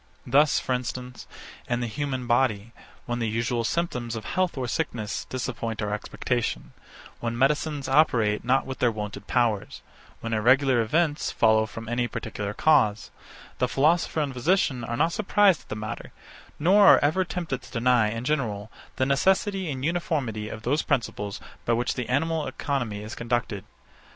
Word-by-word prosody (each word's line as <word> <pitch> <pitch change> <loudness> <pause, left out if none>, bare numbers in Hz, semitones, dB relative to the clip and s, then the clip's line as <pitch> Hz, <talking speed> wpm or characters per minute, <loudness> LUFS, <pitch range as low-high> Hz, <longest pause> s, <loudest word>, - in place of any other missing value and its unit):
Thus, 145 +4 +4
for 130 - -2
instance, 125 0 -5 0.4
in 120 -1 +1
the - - -1
human 130 +1 -3
body, 115 -3 +1 0.3
when 120 0 -2
the 115 -2 0
usual 115 +2 -1
symptoms 125 -5 -2
of 110 - -6
health 185 -4 -1
or 130 -2 -2
sickness 115 -6 -3
disappoint 115 -3 -4
our 105 -1 -2
expectation; 120 +3 -3 0.5
when 115 0 -3
medicines 145 +2 +1
operate 120 -7 +3
not 130 +3 +2
with 130 0 -6
their 120 - +4
wonted 105 -1 -6
powers; 115 -5 0 0.4
when 115 0 -4
irregular 130 +3 +4
events 150 +6 +1
follow 110 0 +3
from 115 +1 -8
any 120 +1 0
particular 105 -2 -5
cause; 110 -9 +3 0.5
the 125 - +2
philosopher 155 +4 +2
and 140 -3 -2
physician 130 -2 +1
are 120 +1 -3
not 165 +5 +2
surprised 205 -4 +3
at - - -24
the - - -3
matter, 105 -1 -6 0.5
nor 195 +6 +5
are - - +9
ever 155 +6 +2
tempted 165 -6 -4
to - - -15
deny, 120 -2 +3
in 115 +2 -4
general, 115 -8 -2 0.2
the 130 - +1
necessity 190 +6 +1
and 135 -2 -3
uniformity 140 -11 -1
of 110 0 -8
those 145 +5 +1
principles 105 -7 -2 0.2
by 120 - +1
which 120 +1 0
the 125 -2 -4
animal 155 +3 0
economy 125 -6 -3
is 110 - -7
conducted. 115 -4 -2
125 Hz, 165 wpm, -26 LUFS, 115-145 Hz, 0.5 s, are